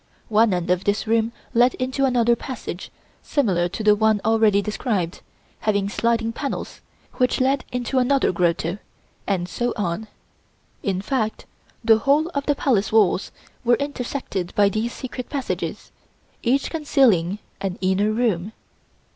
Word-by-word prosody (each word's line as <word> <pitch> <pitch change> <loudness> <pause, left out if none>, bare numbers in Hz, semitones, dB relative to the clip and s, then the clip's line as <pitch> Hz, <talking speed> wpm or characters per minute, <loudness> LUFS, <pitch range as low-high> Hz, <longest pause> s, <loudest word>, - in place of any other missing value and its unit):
One 220 0 +4
end 180 -1 0
of 180 +1 +1
this 205 +1 0
room 225 +1 +1 0.2
led 245 +2 +4
into 260 +2 0
another 240 -2 +3
passage 235 -7 -6 0.3
similar 185 - +1
to 205 +5 -5
the 210 0 +6
one 215 0 +3
already 220 -2 +4
described, 205 -4 -2 0.4
having 205 -2 0
sliding 230 +1 0
panels, 280 +3 -5 0.4
which 250 -1 +2
led 265 +1 +1
into 250 +1 0
another 270 +2 +2
grotto, 175 +1 0 0.5
and 185 -3 0
so 240 +6 -2
on; 200 +2 -2 0.7
in 190 -1 -1
fact 220 -3 -2 0.4
the 225 -1 +6
whole 290 +7 +2
of 280 -5 -3
the 290 - +3
palace 230 -8 +1
walls 205 -3 +3 0.3
were 240 0 +4
intersected 255 -9 -4
by 205 -1 +5
these 215 +4 -2
secret 250 -1 -7
passages, 275 -3 -4 0.5
each 265 +3 +1
concealing 245 - +2 0.2
an 190 -2 -3
inner 190 +2 +2
room. 215 -4 0
225 Hz, 140 wpm, -23 LUFS, 195-255 Hz, 0.7 s, the